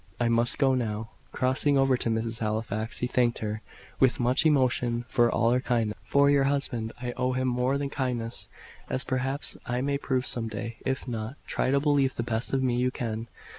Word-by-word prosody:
"I 120 -1 +2
must 115 +1 +2
go 135 -2 +3
now." 110 -3 -2 0.2
Crossing 130 +3 +2
over 135 -1 +4
to 120 - -1
Mrs. 115 +1 -1
Halifax, 110 0 -2
he - - -1
thanked 125 -1 +1
her, 110 0 -3 0.4
with 130 -2 +4
much 125 +6 +3
emotion, 125 -4 +2
for 120 -1 +3
all 115 0 +2
her 125 - +3
kindness. 115 -4 0
"For 140 0 +4
your 140 -1 +4
husband, 135 -5 -1
I 125 0 -3
owe 130 0 +1
him 130 0 0
more 125 +2 +1
than 140 -1 -3
kindness, 125 -4 -3 0.4
as 130 - -1
perhaps 130 +2 -2
I 125 0 -1
may 140 +1 0
prove 130 -2 0
some 115 -2 -2
day. 110 +1 -5
If 130 0 -2
not, 115 +1 -4
try - - -1
to 140 +1 +3
believe 140 -2 +2
the 120 - -2
best 115 0 -2
of 135 -1 +1
me 125 -2 +1
you 125 +1 +2
can. 115 -2 -4
125 Hz, 205 wpm, -28 LUFS, 115-130 Hz, 0.4 s, over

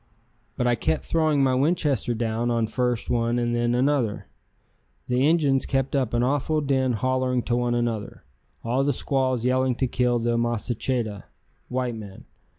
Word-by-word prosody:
But 125 - 0
I 120 - +3
kept 85 -9 -1
throwing 155 -4 +2
my 130 -1 +3
Winchester 140 -3 +1
down 115 +1 -1
on 115 -1 +1
first 120 +1 -1
one 115 0 +1
and 120 0 0
then 120 0 +1
another. 130 -4 0 0.8
The 125 +3 +2
Injuns 145 -5 +2
kept 135 +1 0
up 130 -4 0
an 120 - +2
awful 145 +4 +1
din 135 -3 +1
hollering 130 +2 0
to 120 - 0
one 120 0 0
another, 115 -3 -3 0.4
all 125 +4 +1
the 140 0 +1
squaws 130 -2 0
yelling 130 0 +2
to 130 - 0
kill 125 -1 +1
the 120 0 0
masacheta 120 -2 -2 0.4
(white 125 -1 -1
man). 105 -4 -10
125 Hz, 160 wpm, -25 LUFS, 120-135 Hz, 0.8 s, I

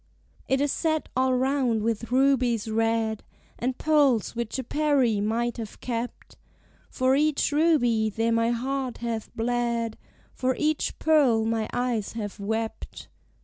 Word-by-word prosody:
"It 265 - +2
is 290 -1 +1
set 315 -2 -1
all 260 0 +2
round 255 -4 +1
with 230 +1 -2
rubies 255 -4 +2
red, 225 -1 0 0.4
And 250 +1 -2
pearls 285 -9 +2
which 235 +1 -3
a 260 - -3
Peri, 270 -6 +1
might 235 +3 -1
have 225 -3 -7
kept. 240 0 -5 0.5
For 260 +1 +2
each 300 0 +1
ruby 270 -8 +3
there 225 +2 0
my 230 0 +2
heart 255 +1 -2
hath 230 -2 -4
bled: 235 -1 -1 0.3
For 255 0 0
each 305 0 0
pearl 270 -9 +3
my 225 -1 -1
eyes 245 -4 -1
have 210 -2 -5
wept." 220 +2 -4
240 Hz, 140 wpm, -26 LUFS, 225-270 Hz, 0.5 s, ruby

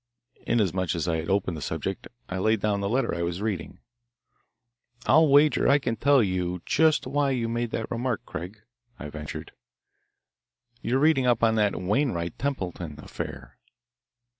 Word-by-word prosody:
Inasmuch 95 -6 +1
as 85 - -1
he 85 - 0
had 80 +1 -4
opened 95 -3 +1
the 75 - -7
subject, 80 +6 -4 0.2
I 95 - -4
laid 110 +3 +2
down 100 -1 0
the 100 - -1
letter 130 +5 +1
I 85 - -2
was 85 +1 -2
reading. 100 -6 -3 1.3
"I'll 160 0 +6
wager 145 +2 +5
I 140 - +6
can 125 -5 -2
tell 140 +2 +4
you 90 -2 -1
just 160 -1 +3
why 140 +2 +1
you 125 -4 0
made 120 +1 -2
that 110 0 -4
remark, 120 -1 -2
Craig," 95 +6 -7 0.3
I 75 - -7
ventured. 75 0 -7 1.3
"You're 125 - 0
reading 140 -3 +3
up 120 -2 +2
on 115 -1 +5
that 105 -2 +1
Wainwright 90 - -1
Templeton 90 - -3
affair." - - -8
105 Hz, 160 wpm, -26 LUFS, 90-130 Hz, 1.3 s, I'll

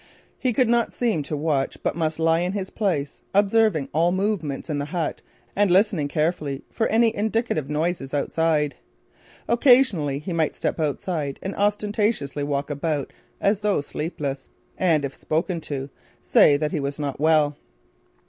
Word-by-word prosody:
He 255 - +1
could 250 +1 +2
not 235 0 +2
seem 225 -10 0
to 145 +1 -4
watch 145 -3 0
but - - 0
must 160 -2 -1
lie 165 0 +3
in 180 +2 -1
his 195 -2 -4
place, 170 -10 -2
observing 205 -7 +3
all 165 +3 +3
movement 185 -7 -1
in 150 -3 -2
the 145 - -2
hut 160 +1 -3 0.3
and 205 0 +3
listening 185 -5 +3
carefully 150 -2 -1
for 225 - 0
any 225 0 +3
indicative 215 - -1
noises 150 -2 -1
outside. 150 0 +1 0.7
Occasionally, 235 - +4
he 160 +5 -5
might 160 -2 0
step - - -2
outside 150 -1 -2
and 195 - -3
ostentatiously 205 - 0
walk 140 0 -2
about 145 -1 -2 0.3
as 200 0 +2
though 210 -4 +1
sleepless, 145 -2 -4 0.3
and, 160 -6 +2
if 135 - -5
spoken 165 +2 -2
to, 140 -2 -5 0.3
say 145 - +5
that 150 +1 -1
he 155 - -1
was 140 +1 -3
not 140 -2 -3
well. 155 -1 +3
160 Hz, 160 wpm, -24 LUFS, 145-200 Hz, 0.7 s, say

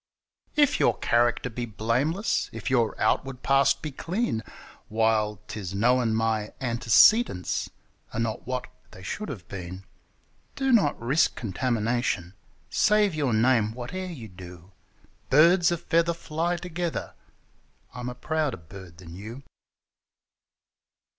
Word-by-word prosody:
If 290 -2 +3
your - - +3
character 120 +1 +2
be 120 0 -5
blameless, 125 - 0
if 115 +3 -5
your 120 -4 +1
outward 135 -2 0
past 135 0 +3
be 155 - -4
clean, 170 - -2 0.5
While 110 -2 +1
'tis 100 -3 -6
known 120 +1 +2
my 110 -1 -1
antecedents 120 - +3 0.4
are 115 - -4
not 115 0 -3
what 125 0 -2 0.2
they 95 - -13
should 210 - -5
have 100 -11 -8
been, 95 0 -7 0.7
Do 270 -1 0
not 205 - +3
risk 130 +8 +2
contamination, 115 -4 -1 0.4
save 210 -3 +3
your 145 -5 0
name 115 -2 +3
whate'er 155 +11 -5
you 125 -9 -8
do 90 -1 -12 0.3
— - - -34
'Birds 170 +4 +5
o' 170 - 0
feather 170 +1 +1
fly 170 +2 -2
together': 175 -1 -4 0.8
I'm 125 0 -5
a 125 - -7
prouder 150 -1 -1
bird 85 +1 -13
than 85 -2 -11
you! 110 +9 -9
120 Hz, 125 wpm, -26 LUFS, 110-155 Hz, 0.8 s, Birds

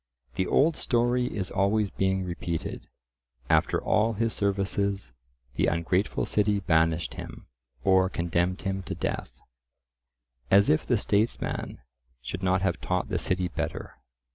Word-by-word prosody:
The 95 - -1
old 155 +3 +3
story 120 +1 +1
is 100 -5 -4
always 100 +1 +1
being 95 0 0
repeated—"after - - -3
all 110 +2 +2
his 115 +1 0
services, 100 -5 -1 0.4
the - - +1
ungrateful 90 +4 0
city 105 -1 +1
banished 80 -2 +1
him, - - -9 0.4
or 95 0 +4
condemned 85 +1 -1
him 95 0 -2
to - - -5
death." - - -4 1.1
As 100 +1 +5
if 80 - +1
the - - +3
statesman 105 - -1 0.4
should 75 +9 -6
not 95 0 +1
have 85 -3 0
taught 90 -1 -1
the - - -1
city 90 -1 0
better! 85 - -5
95 Hz, 130 wpm, -27 LUFS, 85-100 Hz, 1.1 s, As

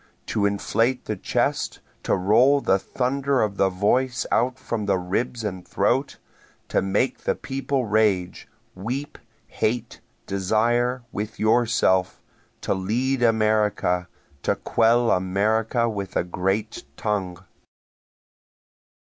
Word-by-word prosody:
To 100 -2 +1
inflate 115 +5 0
the 110 - -2
chest, 90 - -1 0.2
to - - +1
roll 115 +10 +4
the 95 -7 +2
thunder 135 +3 0
of 100 -2 -2
the 95 - +3
voice 115 +6 +1
out 125 +2 +1
from 110 -5 -4
the 100 -1 +2
ribs 110 +6 -2
and 95 -4 -4
throat, 125 +11 0 0.5
To - - +2
make 100 +7 0
the - - -1
people 135 -1 -2
rage, 105 -4 +1 0.3
weep, 130 +10 -5 0.3
hate, 115 +1 -2 0.2
desire, 120 +6 +1
with 105 +1 -5
yourself, 110 -5 +2 0.4
To - - 0
lead 120 +8 -1
America 105 -6 +2 0.3
to - - +1
quell 115 +1 +2
America 110 +6 +1
with 100 -4 -4
a - - +2
great 95 +5 -2
tongue. 95 -5 -2
110 Hz, 115 wpm, -24 LUFS, 95-120 Hz, 0.5 s, roll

